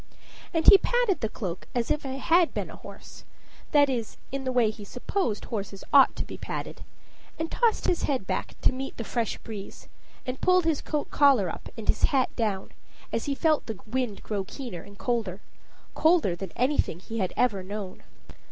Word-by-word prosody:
And 325 -1 0
he 395 - +11
patted 485 -6 +1
the 220 - 0
cloak 185 -6 -5
as 240 -1 0
if 300 - 0
it 265 0 -4
had 340 0 +4
been - - -3
a - - -9
horse - - -12 0.5
that 290 -1 +6
is, 240 -5 -3
in 275 0 -3
the 260 - 0
way 240 -4 +3
he 215 -1 -11
supposed 245 - -2
horses 200 -3 -5
ought 275 -2 +7
to - - -3
be - - -9
patted - - -5 0.5
and 320 0 -3
tossed 465 -3 +2
his 350 - +1
head 265 -9 0
back - - -3
to - - +4
meet 265 +1 -5
the 230 - -3
fresh 230 -1 -2
breeze, 210 -4 -9 0.4
and 255 0 -4
pulled 365 -2 +4
his 320 -3 +1
coat 300 -2 -3
collar 265 - +5
up - - -8
and 220 - -7
his - - +4
hat 265 -3 +1
down 210 -5 -1 0.4
as - - -1
he 285 -2 -1
felt 310 +1 +2
the 220 -4 -5
wind 235 -2 -2
grow 205 -2 -2
keener 195 - -7
and 200 +3 -14
colder 220 -6 -1 0.5
colder 315 - +3
than 185 0 -6
anything 255 - +1
he 225 +4 -5
had 185 -3 0
ever 220 -6 +2
known. 195 0 -6
245 Hz, 195 wpm, -27 LUFS, 205-290 Hz, 0.5 s, he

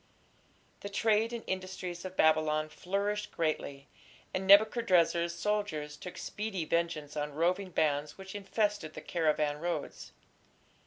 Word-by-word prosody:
The 200 - -6
trade 220 +2 +2
and 235 -1 -5
industries 185 -2 -4
of 185 0 -7
Babylon 155 -1 +3
flourished 200 +5 -2
greatly, 145 -4 -2 0.5
and 190 0 -2
Nebuchadrezzar's 180 -5 +5
soldiers 205 -9 -2
took 180 +4 -9
speedy 205 -5 -4
vengeance 155 -3 -1
on 150 -1 -3
roving 180 +4 +1
bands 150 -3 0
which 190 0 -9
infested 205 -4 -1
the - - -6
caravan 150 -3 0
roads. 175 +2 -4
175 Hz, 120 wpm, -31 LUFS, 155-200 Hz, 0.5 s, Nebuchadrezzar's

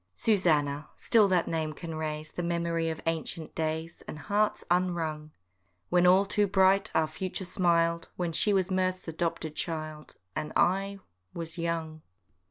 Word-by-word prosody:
C. 225 - +1
LAMB. - - +4
Susannah! 150 -4 +1
still 220 -4 +4
that 180 -3 +2
name 160 -2 -1
can 165 +1 -7
raise 155 -1 -4
The - - -4
memory 170 -1 0
of 160 - -4
ancient 165 0 -2
days, 160 +1 -3
And - - -6
hearts 210 +6 0
unwrung: 165 -4 0 0.6
When 180 0 +4
all 190 +2 +6
too 205 +1 +2
bright 190 0 +4
our 160 - +4
future 185 +4 -4
smil'd, 170 -2 +1
When 175 -2 -2
she 205 +6 +2
was 190 -1 +1
Mirth's 185 -1 0
adopted 165 -1 -2
child, 155 -2 -4 0.2
And 155 0 -3
I—was 170 - -2
young. 165 -2 -2
170 Hz, 155 wpm, -29 LUFS, 155-185 Hz, 0.6 s, all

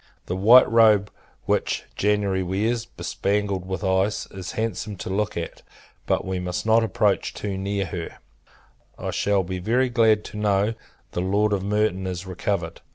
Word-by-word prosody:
The 90 - -3
white 115 +7 +7
robe 110 -3 +4 0.3
which - - 0
January 100 -2 +1
wears, 110 +6 -1
bespangled 100 +1 -2
with 95 +2 -4
ice, 95 +2 +1
is 95 -1 -7
handsome 110 -2 -3
to 95 - -6
look 105 0 -1
at; 85 - -5 0.5
but - - +1
we 95 0 -2
must 90 +2 -3
not 115 +1 +4
approach 110 -2 0
too 100 -2 -4
near 100 +1 -2
her. 85 -2 -6 0.8
I - - -4
shall 100 -2 +1
be 90 +1 -4
very 125 +7 +1
glad 110 -3 +3
to - - -9
know 105 +1 +1 0.4
the 90 - -2
Lord 100 +3 +1
of 100 - 0
Merton 100 -2 0
is 90 0 -4
recovered. 95 -2 -3
100 Hz, 160 wpm, -24 LUFS, 95-105 Hz, 0.8 s, white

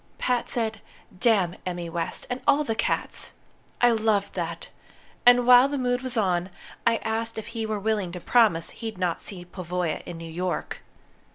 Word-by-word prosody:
Pat 250 -1 0
said 220 -3 -1 0.4
'Damn 195 -7 +2
Emmy 175 -1 -4
West 165 +1 -3
and 250 +1 -4
all 285 +1 +5
the 225 - -1
cats!' 220 - -2 0.5
I 245 0 +6
loved 215 -3 +1
that! 170 -2 -4 0.6
And 245 0 +7
while 250 +1 +8
the 285 0 -2
mood 245 -1 0
was 255 -2 -2
on, 185 -3 +1 0.4
I 230 - +5
asked 225 0 -2
if 220 +1 -6
he 225 -1 -3
were 215 -1 -2
willing 205 -3 -1
to 180 - -5
promise 190 -6 +3
he'd 225 -3 -6
not 180 -2 -1
see 180 -3 -6
Pavoya 180 -2 -3
in 175 - -6
New 165 - -8
York. 175 +2 -3
215 Hz, 175 wpm, -26 LUFS, 180-235 Hz, 0.6 s, while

